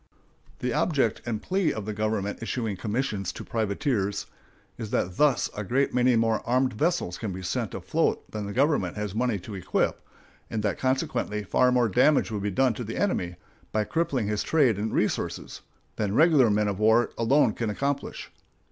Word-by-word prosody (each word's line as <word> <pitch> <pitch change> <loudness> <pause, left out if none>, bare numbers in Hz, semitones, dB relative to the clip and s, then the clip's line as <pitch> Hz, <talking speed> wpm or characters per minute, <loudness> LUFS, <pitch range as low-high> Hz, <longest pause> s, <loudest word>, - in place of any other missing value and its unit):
The 125 -1 -1
object 145 - +1
and 110 -3 -3
plea 190 -2 +1
of 110 -2 -5
the 110 - -3
government 105 -1 -2
issuing 115 -3 -2
commissions 105 -2 -2
to - - -7
privateers 105 -2 -1 0.5
is 110 -3 -6
that 90 -2 -1
thus 150 -4 +3
a 105 - -3
great 130 +7 +1
many 125 0 +3
more 115 -1 +2
armed 130 +2 +1
vessels 110 - -1
can 110 -4 -3
be 95 0 -6
sent 90 - -2
afloat - - -1
than 105 -2 -4
the - - -4
government 130 - +1
has 105 -2 -3
money 120 -1 0
to 100 +3 -9
equip, 95 -1 -1 0.5
and 110 -2 -3
that 105 - -1
consequently 130 -5 -1
far 125 +6 +3
more 125 -2 +3
damage 125 +5 +3
will 105 - -2
be 100 +1 -1
done 125 +5 +2
to 120 - -5
the 115 0 -5
enemy, 90 - 0 0.4
by 110 - +1
crippling 135 -5 -1
his 105 0 0
trade 130 -10 +2
and 110 +1 -2
resources, - - -2 0.4
than 105 -1 -1
regular 150 -5 +5
men 105 0 +2
of 100 -1 -2
war 110 +2 +4
alone 120 0 +3
can 115 -2 -2
accomplish. 140 +6 -3
110 Hz, 185 wpm, -26 LUFS, 105-130 Hz, 0.5 s, regular